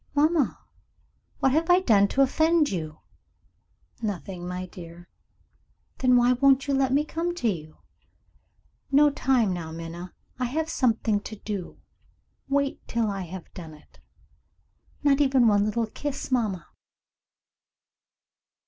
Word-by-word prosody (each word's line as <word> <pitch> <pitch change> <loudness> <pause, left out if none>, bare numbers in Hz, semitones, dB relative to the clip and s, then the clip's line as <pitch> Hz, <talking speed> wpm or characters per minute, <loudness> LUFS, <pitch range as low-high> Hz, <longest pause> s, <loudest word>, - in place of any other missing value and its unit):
"Mamma! 300 -1 +2 0.8
what 270 - +4
have 320 +4 +1
I 355 +1 +6
done 205 - +4
to 275 +6 +3
offend 315 +3 +2
you?" 155 -4 -5 1.0
"Nothing, 185 -4 -4
my 180 0 -4
dear." 175 -1 -12 0.9
"Then 250 -1 +4
why 245 +1 +4
won't 270 +1 +4
you 280 - +1
let 270 -1 +2
me 290 +3 +2
come 340 +3 -3
to 245 - -1
you?" 155 -7 -4 1.1
"No 290 +1 +5
time 250 -8 +1
now, 165 -3 -5
Minna. 165 +2 -7 0.3
I 250 - 0
have 315 +6 -2
something 225 -6 +1
to 215 +1 -8
do. 200 -3 -6 0.7
Wait 280 0 0
till 230 -3 0
I 195 -1 -4
have 180 +1 -10
done 160 -3 -9
it." 150 - -22 1.0
"Not 285 0 +4
even 265 -4 +4
one 205 -1 +3
little 225 +2 0
kiss, 280 +5 -5
mamma?" 210 -9 0
235 Hz, 130 wpm, -26 LUFS, 185-275 Hz, 1.1 s, I